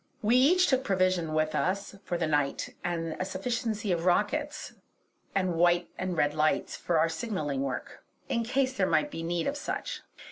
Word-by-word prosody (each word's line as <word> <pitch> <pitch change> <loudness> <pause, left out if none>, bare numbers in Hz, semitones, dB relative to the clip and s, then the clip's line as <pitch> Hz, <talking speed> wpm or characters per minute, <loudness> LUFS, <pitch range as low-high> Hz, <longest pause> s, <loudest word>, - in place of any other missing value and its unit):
We 220 +4 +4
each 340 +9 +5
took 260 -4 +2
provision 185 -6 +1
with 155 0 +1
us 200 +2 -1
for 175 - -2
the 170 - 0
night, 145 -3 0
and 165 -2 -2
a - - +1
sufficiency 210 +2 -2
of 170 -1 0
rockets 290 - 0 0.6
and 185 -2 +1
white 175 +1 +3
and 185 -2 -3
red 145 -1 +2
lights 155 0 +1
for 170 - 0
our 160 +1 +4
signalling 160 - -2
work, 135 -2 -4 0.2
in 230 - 0
case 260 +3 +1
there - - +1
might 295 - +2
be 165 - -5
need 170 0 -1
of 280 - -1
such. - - -4
185 Hz, 180 wpm, -29 LUFS, 165-230 Hz, 0.6 s, each